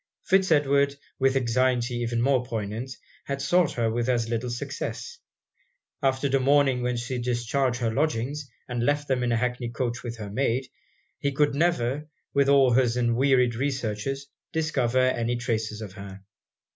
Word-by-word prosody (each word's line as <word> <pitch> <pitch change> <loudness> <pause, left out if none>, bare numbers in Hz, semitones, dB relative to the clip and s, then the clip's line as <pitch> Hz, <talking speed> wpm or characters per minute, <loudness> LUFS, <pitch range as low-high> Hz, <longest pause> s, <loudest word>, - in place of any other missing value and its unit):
Fitz 190 -1 +3
Edward, 140 -2 +3 0.2
with 135 0 +3
anxiety 125 -1 +1
even 120 0 -1
more 130 -1 +3
poignant, 115 +1 -4 0.3
had 140 0 -3
sought 170 +4 +2
her 115 -2 0
with 120 +2 -1
as 120 -2 +1
little 120 +1 -2
success. 470 - -5 0.8
After 135 0 +1
the 135 0 +2
morning 135 -1 +3
when 125 0 -1
she 120 +1 -3
discharged 120 +1 0
her 115 -1 0
lodgings, 145 0 -1 0.2
and 120 -1 -2
left 145 +2 +1
them 130 -2 +1
in 125 -1 0
an 115 - +2
hackney 125 0 -1
coach 120 +1 -3
with 120 -1 -6
her 105 -2 -7
maid, 130 +2 0 0.5
he 140 - 0
could 145 +1 +2
never, 150 -3 0 0.3
with 140 0 +3
all 135 -2 +5
his 125 -1 +3
unwearied 125 +1 +3
researches, 130 0 -2 0.3
discover 145 -7 0
any 120 -2 +2
traces 110 -2 -2
of 100 -4 -7
her. 95 0 -10
125 Hz, 160 wpm, -26 LUFS, 120-140 Hz, 0.8 s, all